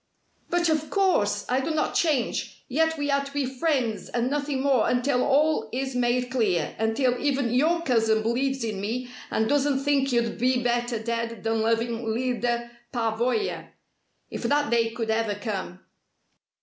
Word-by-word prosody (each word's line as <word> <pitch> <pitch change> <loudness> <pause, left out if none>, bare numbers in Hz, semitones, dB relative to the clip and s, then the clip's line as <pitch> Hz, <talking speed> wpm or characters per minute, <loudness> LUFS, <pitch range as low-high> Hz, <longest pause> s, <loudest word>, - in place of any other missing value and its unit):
"But 345 0 +2
of 310 -1 0
course! 210 - +1
I 255 +1 +1
do 270 - -3
not 310 -1 0
change. 290 -8 -1
Yet 320 +4 +1
we 290 -1 -1
are 280 0 +2
to 275 - -9
be 285 -1 -1
friends 255 -4 -1
and 245 +2 -1
nothing 285 -2 -1
more 270 -5 +3
until 250 +1 +1
all 285 -5 +2
is 265 +2 -3
made 245 0 +1
clear 205 -10 0
until 245 +3 +1
even 275 -4 +1
your 330 +6 +2
cousin 225 -5 +2
believes 260 +3 0
in 215 -4 -3
me 245 +4 -3 0.2
and 220 - +1
doesn't 280 0 +1
think 275 -1 +2
you'd 235 -2 0
be 250 0 +2
better 240 0 0
dead 230 0 -3
than 225 0 0
loving 230 +1 0
Lyda 235 +1 -1 0.2
Pavoya. 240 - -1 0.6
If - - -5
that 290 -1 +1
day 230 -1 +3
could 225 -1 -3
ever 220 -2 0
come!" 195 -4 -5
245 Hz, 160 wpm, -26 LUFS, 225-280 Hz, 0.6 s, more